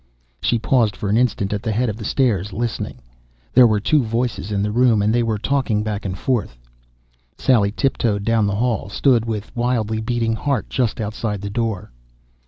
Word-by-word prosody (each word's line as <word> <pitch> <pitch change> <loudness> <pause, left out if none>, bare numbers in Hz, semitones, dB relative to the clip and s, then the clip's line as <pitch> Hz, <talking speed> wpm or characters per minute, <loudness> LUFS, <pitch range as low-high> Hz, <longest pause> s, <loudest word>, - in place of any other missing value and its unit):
She 120 - +2
paused 110 -1 +2
for 100 - -4
an 105 - +3
instant 110 -5 +1
at 105 - -2
the 110 - -2
head 120 +4 +1
of 105 - -2
the 110 - -7
stairs, 105 -6 +1
listening. 115 +3 -4 0.5
There 125 -1 +8
were 105 -2 +2
two 150 +8 +2
voices 115 -3 -2
in 100 -1 0
the 105 - -1
room, 120 -1 +3
and 105 +2 +2
they 120 - +3
were 115 -2 0
talking 115 -3 0
back 105 -1 -4
and 95 -1 -3
forth. 110 - -1 0.8
Sally 105 -6 +3
tiptoed 115 -4 0
down 115 -2 +2
the 100 - -1
hall, 115 -3 -1
stood 120 +1 +2
with 110 -2 -5
wildly 115 -3 0
beating 115 0 0
heart 140 +4 -2
just 125 -3 0
outside 105 -1 -3
the 100 0 -5
door. 110 - -2
110 Hz, 190 wpm, -20 LUFS, 105-120 Hz, 0.8 s, There